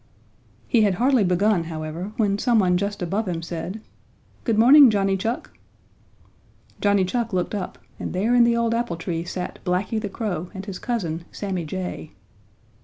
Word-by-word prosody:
He 235 - +3
had 200 -3 +3
hardly 250 +1 +3
begun, 180 0 +2
however, 160 +4 -5
when 205 -2 +1
some 240 0 +3
one 185 -4 +3
just 200 +1 -2
above 195 +5 -1
him 165 -2 -3
said: 175 +5 -5 0.6
"Good 225 -3 +1
morning, 265 +4 +8
Johnny 195 -2 +1
Chuck." 225 +6 -3 1.3
Johnny 200 -2 +3
Chuck 230 +2 -2
looked 180 +2 -1
up 200 -3 -4 0.2
and - - -4
there 205 +6 +1
in 245 -1 +6
the 235 0 +3
old 230 0 +1
apple 230 -7 -1
tree 165 0 -3
sat 180 +1 -5
Blacky 190 +4 -1
the 205 - -3
Crow 185 -5 -4
and 190 0 -6
his 195 -3 -6
cousin, 170 -9 -3
Sammy 190 -5 -3
Jay. 180 -1 -5
195 Hz, 170 wpm, -23 LUFS, 180-225 Hz, 1.3 s, morning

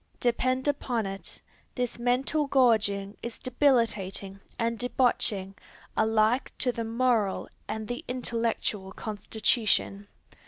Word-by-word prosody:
Depend 255 +2 +1
upon 250 -6 0
it, 195 0 -6 0.3
this 245 -2 -2
mental 260 +5 +1
gorging 215 -7 +3
is 235 -1 -4
debilitating 215 -7 +1 0.2
and 230 0 -1
debauching 235 -6 +1 0.4
alike 220 +3 +2
to 250 - +1
the 235 -1 -3
moral 230 -3 +1 0.2
and 220 -1 -4
the 245 0 -4
intellectual 230 -5 -1
constitution. 210 -1 0
230 Hz, 105 wpm, -28 LUFS, 210-250 Hz, 0.4 s, gorging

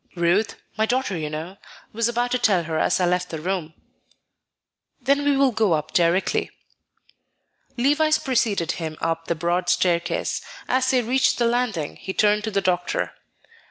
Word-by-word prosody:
"Ruth 175 +5 +1 0.2
my 220 0 +2
daughter, 250 -5 0
you 155 -2 -3
know 160 +5 -6 0.4
was 230 +1 +1
about 240 +1 -1
to 250 - +1
tell 200 -8 +3
her 160 0 -2
as - - +2
I 180 - +2
left 180 0 0
the 160 - -5
room." 170 -2 -3 1.2
"Then 280 +2 +1
we 285 -1 +2
will 275 -1 +4
go 220 -5 +2
up 155 -1 -2
directly." 175 +2 +2 1.3
Levice 295 +5 +3
preceded 210 -10 0
him 160 -2 -5
up 165 0 -2
the 170 - 0
broad 175 +2 -1
staircase. 170 -2 0 0.3
As 260 0 +1
they 255 -2 +2
reached 255 +4 +2
the 240 - +2
landing, 235 -10 -1
he 190 - -6
turned 210 0 +3
to - - -1
the 200 -2 0
doctor. 180 -2 -1
195 Hz, 165 wpm, -23 LUFS, 170-245 Hz, 1.3 s, will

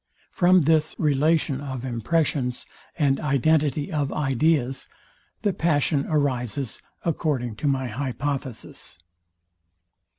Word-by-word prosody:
From 180 0 +5
this 155 0 +2
relation 150 -1 +2
of 130 -3 -5
impressions, 125 +1 0 0.3
and 140 -4 +2
identity 150 +2 +1
of 145 -3 -1
ideas, 135 -1 +1 0.6
the 205 - +2
passion 150 -4 +1
arises, 130 -5 -1 0.2
according 140 -8 -1
to 145 - -2
my 135 -2 +1
hypothesis. 130 - -4
140 Hz, 95 wpm, -24 LUFS, 130-155 Hz, 0.6 s, From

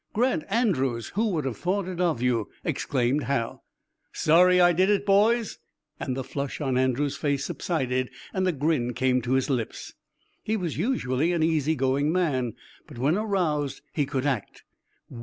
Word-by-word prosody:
"Grant 240 -7 +1
Andrews! 135 - 0
Who 220 +3 0
would 160 -7 -1
have 130 -4 -3
thought 185 +1 -1
it 180 -1 -4
of 160 -9 +1
you!" 120 -4 +1
exclaimed 130 +1 0
Hal. 125 -4 -2 0.5
"Sorry 180 +3 +4
I 175 0 +6
did 185 +4 +3
it, 205 -1 +2
boys?" 215 +3 +3 0.4
and 130 -1 -3
the 135 - -2
flush 140 +1 -4
on 135 -4 -1
Andrews' 130 +2 +1
face 140 -2 -1
subsided 130 -6 -1 0.2
and 185 -1 0
a - - +3
grin 140 -5 0
came 130 0 +2
to 120 +2 -1
his 130 -1 +2
lips. 125 -5 -3 0.5
He 220 +1 -1
was 175 -6 -3
usually 165 - 0
an 165 -2 +1
easy 160 -1 +1
going 135 +2 +1
man, 140 - 0 0.3
but 145 -6 -12
when 140 +7 +2
aroused 175 -11 -1
he 145 -3 0
could 135 -1 -2
act. 130 -8 -2
145 Hz, 170 wpm, -26 LUFS, 130-180 Hz, 0.5 s, I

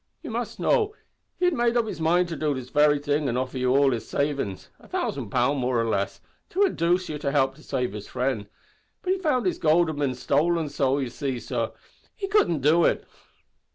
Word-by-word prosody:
You - - -6
must - - -4
know, 430 -3 +2 0.4
he 360 - +1
had 355 - +3
made 240 -2 +2
up 235 - +2
his 210 - -6
mind 175 +3 +3
to 165 - -3
do 150 -2 0
this 130 -1 -7
very 150 0 +4
thing 145 0 0
an' 120 - -1
offer 130 0 -2
you 125 0 +1
all 140 -1 +5
his 115 -3 -3
savings 140 -10 -2
a - - -17
thousand 130 -7 -3
pound, 130 +5 +1
more 125 -1 +1
or 115 - +1
less 100 -3 -1 0.3
to 385 - -1
indooce 180 - +1
you 150 -1 -4
to 140 -2 -1
help 135 -2 +2
to 155 +3 -18
save 125 -6 -2
his 105 -1 -7
frind, 125 -5 -2 0.6
but 370 - +2
he 385 - -3
found 295 - +1
his 185 - 0
goold 165 +1 +4
had 155 - -4
bin 140 -3 0
stolen, 155 +5 +1
so, 135 -1 +1
you 130 -4 -2
see, 135 -2 -3
sor, - - -3 0.4
he 395 - -4
couldn't 280 - +2
do 160 +5 +4
it." - - +2
145 Hz, 225 wpm, -25 LUFS, 130-175 Hz, 0.6 s, all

